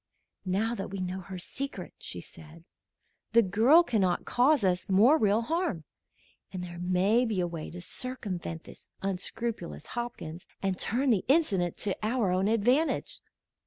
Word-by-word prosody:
"Now 210 +5 +1
that 195 - -4
we 195 +1 -5
know 185 +1 -3
her 185 +1 -8
secret," 275 +10 -5
she - - -6
said, 160 +1 -13 0.7
"the 235 0 +7
girl 225 - +5
cannot 195 - +1
cause 260 +1 +3
us 185 0 +1
more 215 +10 +6
real 215 +2 +3
harm, 320 - -1 0.7
and 185 -2 -5
there 175 -1 -8
may 185 +6 +3
be 220 -6 -1
a 180 - +2
way 170 -3 -5
to 175 - -8
circumvent 185 -8 -5
this - - -12
unscrupulous 195 +1 -3
Hopkins 235 -9 -5
and 190 -2 -1
turn 255 +4 +1
the 205 -5 +2
incident 205 - +2
to 200 -3 -1
our 220 -3 +1
own 185 +2 +2
advantage. 245 +8 +1
200 Hz, 155 wpm, -29 LUFS, 180-240 Hz, 0.7 s, the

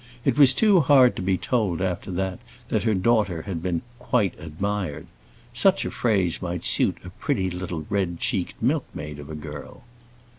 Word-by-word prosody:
It 135 - +2
was 140 -2 +7
too 200 - +5
hard 135 -4 +5
to - - -4
be 95 0 +1
told, 105 -9 0
after 95 0 -2
that, 95 0 -2 0.3
that - - +1
her 110 -2 +1
daughter 95 -4 +1
had 85 -4 -4
been 85 -2 -2 0.2
"quite 115 -6 +1
admired." 85 0 -3 0.5
Such - - +3
a - - -3
phrase 95 -8 +1
might 90 -2 -4
suit - - +2
a - - -8
pretty 95 -1 -2
little 90 -3 -5
red 95 -4 -1
cheeked - - -2
milkmaid 75 0 -2
of 75 0 -10
a 80 - -6
girl. 75 -1 -9
95 Hz, 175 wpm, -24 LUFS, 85-110 Hz, 0.5 s, was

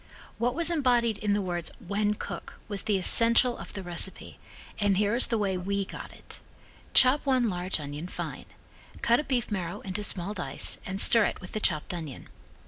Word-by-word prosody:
What 245 +2 0
was 335 +1 +2
embodied 240 -8 +2
in 205 -1 +1
the 205 - -1
words 175 -2 -1
"wen 205 +3 -1
cook" - - -7
was 205 -2 -2
the 210 -2 0
essential 235 +5 +4
of - - -10
the 195 - -6
recipe 175 +2 -2 0.4
and 200 -2 +2
here 210 +1 +1
is 245 - +3
the 230 - 0
way 195 -3 -1
we 200 +2 -2
got - - -9
it: - - -10 0.6
Chop 260 +3 +6
one 255 -5 +2
large 180 0 -2
onion 145 +3 -6
fine. - - -6 0.6
Cut 235 +1 +4
a - - -1
beef 250 -6 -2
marrow 190 0 -4
into 195 +2 -4
small 195 0 -1
dice 180 -4 -2
and 190 +1 -4
stir 225 +1 +7
it - - -3
with 180 - -10
the 215 - -3
chopped 155 -4 +1
onion. 160 -7 -7
205 Hz, 195 wpm, -28 LUFS, 185-235 Hz, 0.6 s, stir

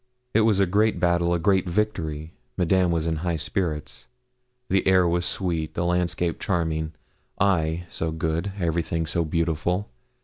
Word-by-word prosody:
It 110 - +4
was 110 -3 +3
a 100 - +5
great 105 +4 +2
battle 85 -1 +2
a 85 - +3
great 95 +2 +2
victory. 80 -6 -2 0.2
Madame 90 0 +3
was 85 -2 0
in 80 -1 0
high 85 +1 -1
spirits. 80 -2 -3 0.6
The 95 0 +1
air 95 -2 +5
was 85 +1 +1
sweet 80 -4 -2
the 85 - 0
landscape 90 -1 0
charming 80 -4 -1 0.5
I, 85 -3 +1
so 80 -1 -3
good 80 +4 -1
everything 85 -1 0
so 85 +2 0
beautiful! 85 +4 -1
85 Hz, 150 wpm, -25 LUFS, 80-95 Hz, 0.6 s, a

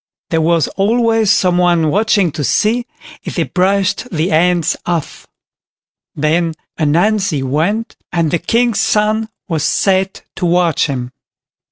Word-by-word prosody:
There 165 -1 +2
was 165 -2 +2
always 225 +1 +1
someone 175 -4 +2
watching 205 -3 +2
to 145 - -4
see 235 - +1 0.4
if - - -6
they - - +1
brushed 195 +5 0
the 165 +1 -1
ants 170 +1 +2
off. 170 -4 -4 0.9
Then 160 +2 0 0.2
Ananzi 175 0 +1
went, 170 - -1
and 165 -3 0
the 170 - +1
King's 230 +5 +1
son 215 +1 +1 0.2
was 160 -5 -2
set 190 -1 0
to 180 - 0
watch 170 -3 +2
him. 125 -3 -4
180 Hz, 130 wpm, -15 LUFS, 160-210 Hz, 0.9 s, There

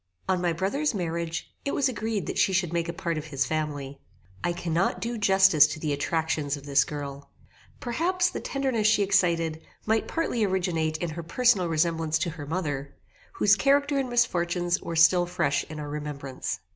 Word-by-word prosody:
On 185 -1 +1
my 175 -1 +1
brother's 210 - -1
marriage, 170 -2 -3
it 280 - -2
was 280 - +2
agreed 220 -4 -2
that - - -3
she 190 - +3
should 180 -3 0
make 170 0 -1
a - - 0
part 170 -2 -3
of 150 - -8
his 135 -3 -1
family. 145 -2 -3 0.4
I 175 - +1
cannot 170 +1 -1
do 235 +1 -3
justice 190 -7 +5
to 155 - -6
the 150 -2 -1
attractions 150 -1 -1
of 140 - -12
this 140 -1 +4
girl. 140 -1 -7 0.5
Perhaps 355 +9 0
the - - -4
tenderness 260 -6 0
she 215 -1 +4
excited 170 -5 +1 0.2
might 220 0 +1
partly 325 -9 -1
originate 175 -5 0
in 170 0 -3
her 170 +2 -5
personal 185 +1 +2
resemblance 160 -1 +1
to 170 - -2
her 150 -3 -8
mother, 145 -5 -3 0.4
whose 205 - +4
character 280 +4 +2
and 265 -2 -2
misfortunes 175 -7 +1
were 170 - -5
still 175 +2 +5
fresh 165 -5 0
in 155 -1 -8
our 145 -1 -5
remembrance. 145 -3 -5
170 Hz, 185 wpm, -26 LUFS, 155-205 Hz, 0.5 s, justice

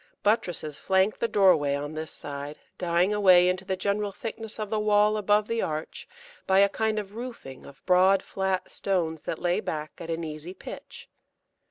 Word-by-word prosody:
Buttresses 175 -8 0
flank 190 +2 +1
the 235 - +1
doorway 175 -10 +4
on 145 +2 -4
this 155 0 -5
side, 145 +1 -7 0.2
dying 180 +3 +2
away 185 -4 +6
into 185 +1 0
the 190 - -1
general 200 +2 -1
thickness 225 +1 -7
of 215 -1 -4
the 215 - +1
wall 210 0 +3
above 210 0 +2
the 230 0 -1
arch 155 0 -4 0.4
by 190 - +4
a 200 +1 +6
kind 220 +1 -1
of 205 -1 -4
roofing 230 - -8
of 140 - -16
broad 185 +1 +4
flat 190 -1 -2
stones 165 -5 -1
that 160 - -4
lay 175 0 0
back 155 -1 -4
at 165 -1 -8
an 165 0 -2
easy 155 +3 -7
pitch. - - -10
190 Hz, 180 wpm, -27 LUFS, 160-210 Hz, 0.4 s, away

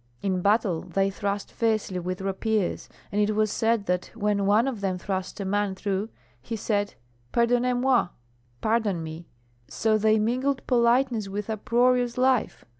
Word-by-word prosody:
In 190 -2 0
battle 200 -4 +2
they 195 0 0
thrust 200 +1 -3
fiercely 215 -5 0
with 185 +1 -4
rapiers, 195 +1 -1 0.2
and 210 0 +1
it 210 0 +1
was 215 -1 +2
said 225 -2 +1
that 180 -1 -1
when 205 -3 0
one 215 +5 +4
of 240 -7 -3
them 190 -2 -1
thrust 190 +2 -4
a 200 - -3
man 200 0 0
through 200 +2 -2 0.3
he 225 - -5
said, 205 -1 -1 0.4
'Pardonnez 245 +1 +2
moi!' 250 -3 +3 0.5
(pardon 215 -6 +1
me); 160 +1 -8 0.4
so 215 -1 +1
they 220 +1 +4
mingled 255 +5 0
politeness 240 -2 +2
with 205 +2 -4
uproarious 245 +2 +2
life. 255 -2 +1
210 Hz, 155 wpm, -26 LUFS, 195-235 Hz, 0.5 s, one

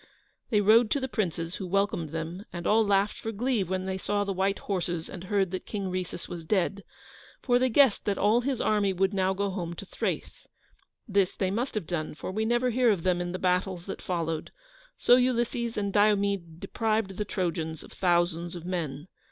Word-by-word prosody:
They 210 -3 +3
rode 220 +3 +6
to 285 - +1
the 265 - -2
princes, 175 -7 -2
who 190 - -5
welcomed 195 -4 0
them, 165 +4 -5
and 175 -1 -6
all 220 +1 +4
laughed 200 0 +1
for 225 - -4
glee 235 0 0
when 185 +1 -2
they 190 0 -2
saw 205 +2 0
the 200 -1 -2
white 195 +1 +1
horses 175 -4 -2
and 185 0 -8
heard 195 -2 +1
that 185 - -5
King 195 -3 -3
Rhesus 180 -2 -4
was 170 -2 -6
dead, 195 +3 0 0.6
for 245 -2 +3
they 255 0 +2
guessed 255 -2 +4
that 200 -2 0
all 215 +4 +3
his 260 -1 -1
army 205 -2 +2
would 190 +2 +1
now 190 0 +1
go 200 0 -1
home 175 -3 -4
to 200 - -8
Thrace. - - -4 0.6
This 200 -3 +2
they 190 -1 0
must 235 +6 -2
have 210 - -2
done, 155 -3 -3
for 170 - -5
we 215 +3 -1
never 240 +2 +2
hear 245 0 +3
of 195 -6 +1
them 180 -1 +2
in 175 0 -3
the 185 - -3
battles 180 -1 0
that 195 - -6
followed, 165 -3 -2 0.5
so 245 - +6
Ulysses 240 -2 0
and 200 -1 -1
Diomede 200 -5 +2
deprived 215 -3 -1
the 210 - 0
Trojans 170 -5 -3
of - - -14
thousands 175 -1 +1
of 170 -1 -8
men. 160 -4 -3
195 Hz, 205 wpm, -28 LUFS, 175-215 Hz, 0.6 s, rode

